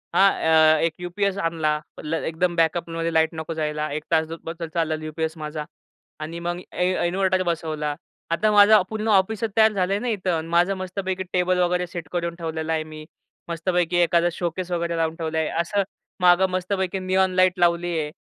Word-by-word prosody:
हां, 195 0 +6
अ, 160 -1 +4
एक 165 - -1
यू-पी-एस 195 +2 -1
आणला, 160 -4 0 0.5
एकदम 170 +2 0
बॅकअपमध्ये 165 0 0
लाईट 160 0 +3
नको 160 +1 -4
जायला, 150 -1 -2
1 155 0 -3
तास 160 -1 +3 0.2
बस 165 +1 -7
चालला 160 -2 0
यू-पी-एस 160 +1 -3
माझा. 150 0 -5 0.5
आणि 160 +2 -6
मग 175 0 -3
इन्व्ह 185 0 -1
इन्व्हर्टर 185 +1 +1
बसवला. 155 -3 -2 0.4
आता 210 +6 +2
माझं 210 0 +7
पूर्ण 220 0 -3
ऑफिस 205 +2 +2
तयार 220 0 +6
झालंय 195 0 0
ना 250 - -4
इथं 185 -6 -1
माझं, 175 +3 +3
मस्तपैकी 190 0 -3
टेबल 180 0 +2
वगैरे 180 0 +1
सेट 170 -3 -7
करून 170 -1 -2
ठेवलेला 160 -1 -3
आहे. 155 -1 0
मी 155 0 -10 0.4
मस्तपैकी 175 +1 0
एखादा 170 0 +3
शोकेस 175 +1 -4
वगैरे 170 -1 -1
लावून 165 0 0
ठेवला 160 -1 -3
आहे. 160 - +1
असं 200 +3 0 0.4
मागं 180 +1 +5
मस्तपैकी 190 +1 -2
निऑन 185 0 +1
लाईट 185 0 +3
लावली 175 0 +2
आहे. 150 -1 -3
175 Hz, 170 wpm, -23 LUFS, 160-185 Hz, 0.5 s, माझं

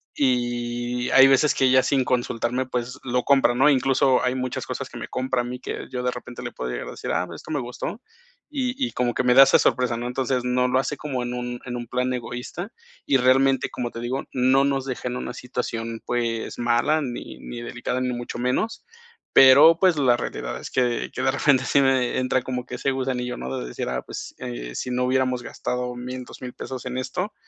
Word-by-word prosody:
Y 120 -1 -1
hay 135 - +8
veces 135 +2 +4
que 130 -1 +3
ya 130 0 +6
sin 135 0 +1
consultarme, 125 0 -1
pues, 125 0 -4
lo 125 -1 0
compra, 135 -3 +4
¿no? 135 +4 +4
Incluso, 135 -1 +3
hay 125 0 +1
muchas 130 -1 -3
cosas - - -4
que - - -10
me - - -6
compra 130 -1 -1
a - - -4
mí 125 +1 -6
que - - -6
yo 125 -1 -3
de 125 - +1
repente 125 0 -8
le - - -5
puedo 65 - -5
llegar - - -4
a - - -6
decir: - - -7
"Ah, - - 0
esto - - -11
me 145 - 0
gustó", 125 - -5 0.5
y 260 -4 -2
y - - -8
como 120 -1 -1
que - - +1
me 125 0 +4
da 135 - +9
esa - - +5
sorpresa, 125 -2 +1
¿no? 120 - -4
Entonces, 125 0 -1
no 125 0 +1
lo 125 +1 +2
hace 140 +2 -1
como 130 -4 -3
en 120 0 -4
un 125 0 -4
en 125 - -4
un 120 -1 -6
plan 125 +1 -1
egoísta. 125 - -5 0.4
Y 135 - +4
realmente, 135 +1 +3
como 120 -1 -3
te 115 - -8
digo, 130 +3 -2
no 130 +2 +4
nos 135 -1 0
deja 130 -1 -4
en 125 0 -3
una 125 - -5
situación, 115 -2 -4
pues, 120 -1 -2
mala 120 +6 +2
ni 125 -4 -6
ni 120 -1 -7
delicada, 120 +1 -3
ni 125 -1 -1
mucho 120 0 -5
menos. 125 - -1 0.5
Pero, 145 +5 +8
pues, 185 -4 +4
la 130 -4 +4
realidad - - -4
es - - -7
que 125 -2 0
yo - - -3
de 130 - +3
repente 140 -2 +3
sí 140 - +3
me 130 -2 +2
entra 130 0 +1
como 125 -1 -4
que 125 - -5
ese 135 +2 0
gusanillo, 125 -2 -2
¿no? 65 +1 -4
De 60 - -4
decir, - - -4
ah, 65 0 -3
pues, - - -8
eh, - - -6
si 125 - -3
no 125 0 +1
hubiéramos 130 -1 +1
gastado 125 0 -3
1000 125 +1 -6
$2000 125 0 -9
pesos 130 -2 -7
en 125 0 -4
esto, 185 +10 -3
125 Hz, 225 wpm, -24 LUFS, 120-130 Hz, 0.5 s, da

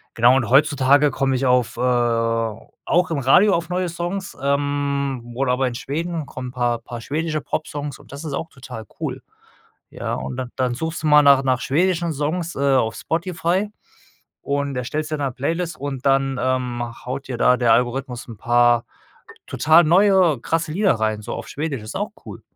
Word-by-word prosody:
genau 120 +3 +5
und 130 -4 0
heutzutage 145 +1 +4
komm 135 0 0
ich 130 +1 0
auf 125 -2 +2
äh - - -3
auch 115 +6 0
im 160 - 0
Radio 180 +10 +5
auf 170 -1 0
neue 180 0 -1
Songs 175 +3 -4
ähm, 140 -3 -1
oder 130 0 0
aber 130 +1 +1
in 125 - -4
Schweden 160 +5 -3
kommen 130 -2 -7
'n - - -10
paar 120 -2 0
paar 120 +1 -8
schwedische 155 +4 -2
Popsongs 145 -1 -4
und - - -17
das 140 +2 -8
ist 150 - -4
auch 160 +3 -4
total 125 -6 -9
cool. - - -4 0.7
Ja, - - -4
und - - -5
dann 130 -1 -5
dann 125 -2 0
suchst 160 +6 -4
du - - -2
mal 150 0 +7
nach 140 -2 +6
nach 130 -2 +1
schwedischen 170 +4 +1
Songs, 160 +4 -2
äh, 140 0 +2
auf 115 -3 +1
Spotify 170 +6 -1 0.7
und 140 -1 -2
erstellst 150 +5 -3
dir - - +1
'ne 140 -3 -2
Playlist 165 +7 -3
und 135 -2 -5
dann, 135 -1 +2
ähm, 125 -2 -1 0.2
haut 135 +2 -5
dir 125 -3 -4
da 125 - +4
der 120 -2 +4
Algorithmus 125 0 -1
'n 115 - -9
paar 120 +1 +3 0.6
total 160 +3 +5
neue, 185 - +4
krasse 160 +2 -1
Lieder 195 -2 +3
rein 110 -1 -1
so - - -5
auf - - -6
Schwedisch. 145 -4 -3
Ist 110 - -8
auch - - -3
cool. - - -9
140 Hz, 185 wpm, -21 LUFS, 125-160 Hz, 0.7 s, mal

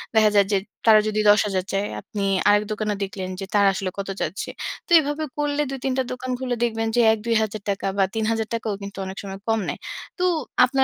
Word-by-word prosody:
দেখা 215 -1 +6
যায় 200 -1 +6
যে 200 - +5 0.3
তারা 215 -1 +8
যদি 215 0 0
১০,০০০ 205 -3 +3
চায়, 195 +1 0
আপনি 205 0 -5 0.3
আরেক 205 0 +5
দোকানে 215 0 -1
দেখলেন 190 -1 -5
যে 195 - -4
তারা 200 -1 +5
আসলে 190 0 -2
কত 195 0 -4
চাচ্ছে। 200 - -3 0.4
তো - - -17
এভাবে 295 +1 -2
করলে 295 0 0
২-৩ 270 -1 -2
টা 260 - +2
দোকান 255 0 -5
ঘুরলে 250 -1 -2
দেখবেন 225 -1 0
যে 240 - +5
৳১,০০০-২,০০০ 220 -1 -1
টাকা 195 0 -1
বা 195 - +4
৳৩,০০০ 225 0 0
টাকাও 220 -2 -1
কিন্তু 200 0 -8
অনেক 190 +1 -7
সময় 195 -1 -7
কম 225 0 +2
নেয়। - - -3 0.4
তো 365 - +1 0.4
আপনার 265 +1 +2
215 Hz, 205 wpm, -23 LUFS, 200-240 Hz, 0.4 s, তারা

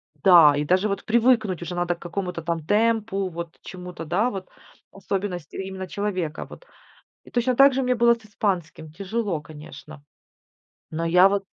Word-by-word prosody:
Да, 160 -1 +7
и 150 - -1
даже 185 +6 +2
вот 200 0 -3
привыкнуть 225 -5 +2
уже 175 +1 -5
надо 175 0 0
к - - -24
какому-то 180 0 -4
там 165 -1 -3
темпу, 210 -1 +1
вот 170 -1 -7
чему-то, 180 -2 -8
да, 190 +9 +1
вот 190 -5 -7 0.4
особенности 195 -4 -4
именно 190 0 -5
человека. 185 -5 -3
Вот, - - -14 0.6
и - - -16
точно 245 +1 0
так 275 +1 +7
же 265 - 0
мне 250 0 +1
было 235 0 +4
с 230 -1 -16
испанским. 175 -7 -3
Тяжело, 195 -1 -3
конечно. 150 -1 -12 0.9
Но 165 +1 -3
я 180 +3 +6
вот 200 0 -1
185 Hz, 165 wpm, -24 LUFS, 170-210 Hz, 0.9 s, Да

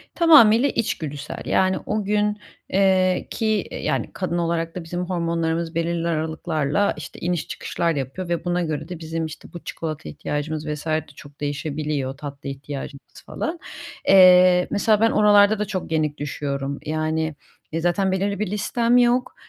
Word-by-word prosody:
Tamamıyla 280 -7 +6
içgüdüsel, 150 -10 -3
yani, 190 0 +2
o 215 0 -1
gün, 210 +1 0 0.3
eee, 185 -1 +2
ki 220 -2 0
yani - - -2
kadın 175 -2 -2
olarak 165 -1 -1
da 180 - -5
bizim 175 +2 -4
hormonlarımız 170 -2 -1
belirli 170 0 -1
aralıklarla 160 +1 0
işte - - -9
iniş 175 -2 -2
çıkışlar 170 -1 -2
yapıyor 140 +7 -4
ve 170 0 -2
buna 175 0 0
göre 155 0 -4
de 175 -2 -6
bizim, 160 0 -3
işte, 155 -1 -10
bu 175 - -6
çikolata 155 -2 -5
ihtiyacımız 150 +1 -4
vs. 150 +1 -4
de 155 0 +1
çok 145 0 -14
değişebiliyor, 145 -2 -3
tatlı 140 -1 -7
ihtiyacımız 140 0 -8
falan. 330 +1 -4 0.5
Eee, 180 -1 +7
mesela 210 +1 +2
ben 225 - +4
oralarda 210 0 +5
da 210 - 0
çok 185 -4 -5
yenik 155 -2 0
düşüyorum. 140 -1 -3
Yani, 155 0 -1 0.4
e, 165 - 0
zaten 185 +3 +1
belirli 200 +1 -1
bir 215 - -1
listem 230 +4 +1
yok, 245 +1 +2
170 Hz, 155 wpm, -23 LUFS, 155-195 Hz, 0.5 s, Eee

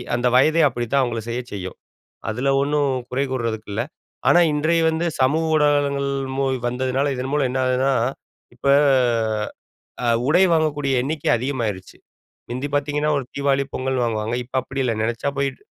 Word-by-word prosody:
அந்த 120 +1 +1
வயதே 155 +6 +4
அப்படித்தான் 120 +1 0
அவங்கள 120 -2 -2
செய்யச் 120 +1 -4
செய்யும். 95 -2 -6 0.5
அதில 125 +5 -1
ஒண்ணும் 145 0 +1 0.2
குறை 130 +2 0
கூறுறதுக்கு 115 -4 -3
இல்ல. 110 +3 -1 0.5
ஆனா 175 - +6
இன்றைய 160 +3 +2
வந்து 160 +1 -1 0.2
சமூக 150 +5 +2
ஊடகங்கள் 145 -2 +2 0.3
மு 135 - +1 0.2
வந்ததுனால 130 +3 0
இதன் 130 +1 -4
மூலம் 145 -3 +2
என்ன 130 - -1
ஆகுதுன்னா, 130 +2 +2 0.6
இப்ப 125 - -5 1.4
அ - - +1 0.2
உடை 175 +5 +5
வாங்கக்கூடிய 150 -4 +1
எண்ணிக்கை 150 +3 -1
அதிகமாயிருச்சு. 115 -7 -4 0.5
முந்தி 130 +4 -3
பாத்தீங்கன்னா, 145 +1 0
ஒரு 135 - -4
தீபாவளி, 140 -1 +1
பொங்கல்னு 130 -1 -1
வாங்குவாங்க. 110 0 -1
இப்ப 125 - -26
அப்படி 135 +2 -3
இல்ல. 120 -3 0
நினச்சா 115 +5 -1
போய்ட்டு 140 -1 -2
135 Hz, 150 wpm, -22 LUFS, 120-145 Hz, 1.4 s, ஆனா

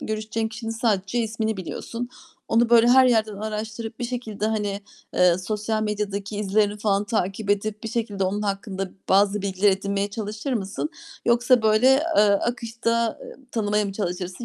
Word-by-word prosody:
görüşeceğin 220 +1 -2
kişinin 225 +1 -6
sadece 220 -2 0
ismini 220 -1 -1
biliyorsun. 230 +6 -5 0.4
Onu 230 +1 +3
böyle 235 0 +6
her 260 +1 +7
yerden 220 -4 +2
araştırıp, 220 +2 -5
bir 245 - -3
şekilde, 235 -4 -3
hani, 205 -2 -1 0.3
eee, 180 -1 +4
sosyal 215 +3 -2
medyadaki 210 -1 -3
izlerini 205 0 +1
falan 205 -1 +1
takip 200 -1 -1
edip, 205 +1 -1
bir - - -2
şekilde 215 -4 -2
onun 200 +3 -1
hakkında 195 -1 -3 0.2
bazı 200 +1 +3
bilgiler 200 +1 +2
edinmeye 200 +1 -1
çalışır 215 +5 -4
mısın? 210 +6 -2 0.3
Yoksa 240 0 +4
böyle, 215 +3 +4 0.3
eee, - - +7
akışta, 230 +2 0
ııı, - - -10
tanımaya 210 -2 +1
mı 200 - -4
çalışırsın? 185 +1 -4
215 Hz, 155 wpm, -24 LUFS, 200-225 Hz, 0.4 s, her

